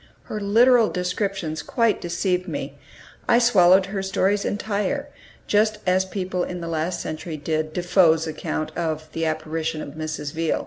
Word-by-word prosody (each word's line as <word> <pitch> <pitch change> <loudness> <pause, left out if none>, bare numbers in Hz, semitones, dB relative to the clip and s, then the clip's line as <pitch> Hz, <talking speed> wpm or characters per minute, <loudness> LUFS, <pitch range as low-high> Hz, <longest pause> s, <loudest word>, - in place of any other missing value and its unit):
Her 215 - -5
literal 230 +3 +5
descriptions 180 -3 -2
quite 230 - +1
deceived 180 +1 -1
me; - - -4 0.5
I - - +5
swallowed 190 -6 +5
her 195 0 -4
stories 195 +1 +1
entire, 210 +7 -2 0.4
just 215 +1 +2
as 185 +1 +3
people 185 -1 -3
in 180 - -5
the 170 - -5
last 165 +2 -2
century 155 0 -5
did 155 +1 -2
Defoe's 175 -2 +3
account 155 0 -4
of 155 -2 -3
"The 165 0 -1
Apparition 155 0 -2
of 150 - -6
Mrs. 155 -1 -5
Veal." 165 0 0
180 Hz, 150 wpm, -23 LUFS, 160-200 Hz, 0.5 s, literal